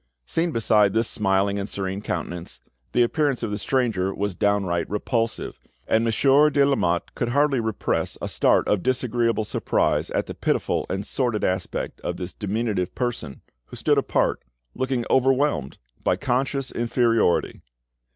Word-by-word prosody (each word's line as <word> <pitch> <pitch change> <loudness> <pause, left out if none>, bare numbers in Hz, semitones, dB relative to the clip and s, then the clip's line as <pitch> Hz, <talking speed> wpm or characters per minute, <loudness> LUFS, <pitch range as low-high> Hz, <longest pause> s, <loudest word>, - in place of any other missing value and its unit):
Seen 165 - 0
beside 105 -5 +3
this 115 0 +2
smiling 100 0 +1
and 100 - -4
serene 95 0 -3
countenance, 85 -4 -5 0.3
the 120 - +4
appearance 140 0 0
of 110 - -2
the 105 - -2
stranger 110 -6 0
was 100 -1 -2
downright 95 -3 0
repulsive, 115 +2 -2 0.3
and 110 - +3
Monsieur 135 +6 +4
de 140 -1 +3
Lamotte 90 -12 0
could 120 - -2
hardly 140 +1 +2
repress 110 -2 -2
a - - -4
start - - +2
of 105 - +2
disagreeable 120 -2 0
surprise 105 - 0
at - - -1
the - - -6
pitiful - - -1
and 95 +2 -3
sordid 120 -5 -1
aspect 90 -1 -2
of - - -3
this 90 0 -6
diminutive 105 -3 -2
person, 120 - -3 0.2
who - - -11
stood - - +2
apart, - - 0 0.3
looking 130 -2 -1
overwhelmed 130 - +2 0.3
by - - +2
conscious 135 +4 -1
inferiority. 115 -5 +1
115 Hz, 150 wpm, -24 LUFS, 100-130 Hz, 0.3 s, the